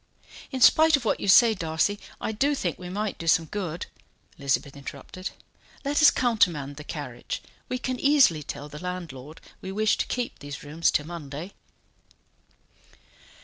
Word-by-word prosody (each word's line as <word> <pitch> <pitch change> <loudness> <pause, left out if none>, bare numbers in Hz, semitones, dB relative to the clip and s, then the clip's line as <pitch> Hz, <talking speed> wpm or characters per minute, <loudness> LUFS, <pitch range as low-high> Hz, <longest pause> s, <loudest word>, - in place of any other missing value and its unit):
"In 260 -2 -4
spite 315 +6 +7
of 255 - -8
what - - +1
you - - -4
say, 225 +4 +7
Darcy, 165 +2 0 0.2
I - - -2
do 280 +7 +1
think 175 - -2
we 180 -1 -7
might 205 +2 -3
do 165 - -6
some 165 0 +4
good," 175 -1 -4 0.5
Elizabeth 140 0 0
interrupted. 140 +6 -7 0.6
"Let 290 +2 +2
us 300 - +9
countermand 175 - +1
the 150 - -7
carriage. 140 -6 -5 0.3
We 255 - -1
can 255 0 -3
easily 275 - +5
tell 145 0 -6
the 150 0 -9
landlord 165 -6 -6 0.2
we 190 - -6
wish 215 +2 +2
to - - -1
keep 245 -1 -3
these 145 -1 -8
rooms 150 +3 +1
till 150 - +1
Monday." 165 +1 -7
180 Hz, 160 wpm, -26 LUFS, 150-225 Hz, 0.6 s, us